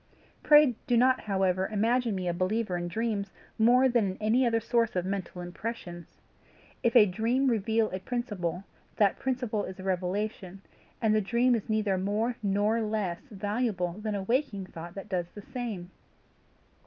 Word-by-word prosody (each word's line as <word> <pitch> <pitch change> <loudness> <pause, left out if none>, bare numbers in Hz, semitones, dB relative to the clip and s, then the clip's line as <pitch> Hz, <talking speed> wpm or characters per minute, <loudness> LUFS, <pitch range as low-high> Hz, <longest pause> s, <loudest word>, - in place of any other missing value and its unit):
Pray 295 -4 +6
do 245 - +3
not 255 +2 +4
however 190 -2 +1
imagine 230 +1 +1
me 185 -1 -3
a 175 - +1
believer 185 +2 -1
in 175 0 -2
dreams 210 +1 -2 0.3
more 250 +4 +5
than 235 -6 +2
in 185 - -6
any 230 +4 +3
other 230 -1 +2
source 230 -1 0
of 180 -1 0
mental 190 -2 -4
impressions. 175 -2 -7 0.6
If 235 0 +1
a 225 -4 +9
dream 225 +8 +1
reveal 220 0 +1
a 185 - -3
principle, 190 -6 -3 0.3
that 205 -2 +2
principle 245 -5 -1
is 190 - -7
a - - -7
revelation, 190 +1 -3 0.4
and 215 -1 +4
the 215 - +3
dream 240 +5 +2
is 225 -1 -2
neither 210 -3 +1
more 215 +5 0
NOR 205 +3 +1
LESS 210 -1 -2
valuable 205 -3 -1
than 215 -1 -3
a 195 - -3
waking 225 -3 -1
thought 170 -1 -9
that 195 0 -7
does 180 -4 -2
the 205 - -9
same. 210 -8 -5
210 Hz, 165 wpm, -29 LUFS, 190-230 Hz, 0.6 s, a